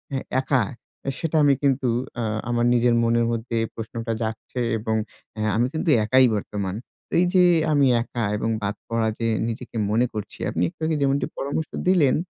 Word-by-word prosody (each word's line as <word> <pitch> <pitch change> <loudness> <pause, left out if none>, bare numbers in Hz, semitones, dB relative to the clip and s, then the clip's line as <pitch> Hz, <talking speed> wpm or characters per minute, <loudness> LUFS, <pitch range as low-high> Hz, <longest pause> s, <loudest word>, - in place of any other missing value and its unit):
এ - - +1 0.2
একা, 130 -3 +2 0.6
সেটা 165 -1 -2
আমি 145 -1 +5
কিন্তু 135 -2 +2 0.3
অ্যা 120 - -3 0.3
আমার 120 0 +1
নিজের 120 0 +3
মনের 115 0 +2
মধ্যে 115 0 -2 0.2
প্রশ্নটা 115 +1 -4
জাগছে 110 +3 -4 0.2
এবং 110 0 -1 0.4
অ্যা 110 -1 -1
আমি 120 +3 +2
কিন্তু 160 +1 -1 0.2
একাই 130 +4 +5
বর্তমান। 100 -2 -3 0.4
এই 175 - +5
যে 185 -1 +6 0.3
আমি 145 -2 +4 0.2
একা 120 -1 -4
এবং 115 - -1
বাদ 105 +1 -2
পড়া 115 -1 0
যে 115 - 0 0.2
নিজেকে 115 +1 -5
মনে 115 +3 +3
করছি, 105 -2 -6
আপনি 85 - -1
একটু - - -24
আগে 160 0 +1
যেমনটি 140 0 +2
পরামর্শ 145 +3 -2 0.2
দিলেন। 170 -8 +4
120 Hz, 170 wpm, -24 LUFS, 110-135 Hz, 0.6 s, যে